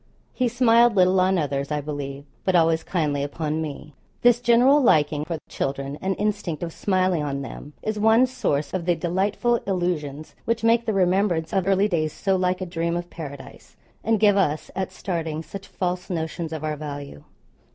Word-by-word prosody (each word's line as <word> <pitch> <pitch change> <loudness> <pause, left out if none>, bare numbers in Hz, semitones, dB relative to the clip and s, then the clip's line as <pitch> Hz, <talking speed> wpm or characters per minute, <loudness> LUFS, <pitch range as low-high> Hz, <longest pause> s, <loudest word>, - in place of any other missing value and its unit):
He 255 - +1
smiled 235 -1 +4
little 185 0 +4
on 185 +1 +3
others 140 -3 -1
I 150 - 0
believe, 140 -1 -5 0.2
but 185 - +1
always 165 -1 +3
kindly 150 -6 -1
upon 150 +2 -2
me. 150 -1 -7 0.3
This 240 0 +5
general 245 +5 +5
liking 150 - +3
for 165 0 -3
children 140 +1 -3
and 190 0 -1
instinct 205 -6 -2
of 165 -1 -4
smiling 185 -4 +1
on 140 -1 -3
them 145 +2 -9
is 215 -1 -2
one 220 +4 +5
source 150 - -2
of 185 -3 -2
the 175 -1 +2
delightful 195 +8 0
illusions 155 -6 -2
which 230 -1 -1
make 230 +1 +3
the 220 - +1
remembrance 180 -3 +1
of 190 -2 +1
early 195 +1 +3
days 155 -6 -1
so 195 -1 0
like 185 0 0
a - - -1
dream 170 -1 -2
of 175 0 -6
Paradise, 140 -4 -10 0.3
and 225 0 +2
give 205 -1 +5
us, 155 -6 0
at 190 -1 -2
starting, 165 -4 -3
such 195 +5 -9
false 180 -1 -3
notions 165 -1 -3
of 160 -1 -5
our 155 -1 -1
value. 145 - -7
175 Hz, 185 wpm, -24 LUFS, 150-200 Hz, 0.3 s, This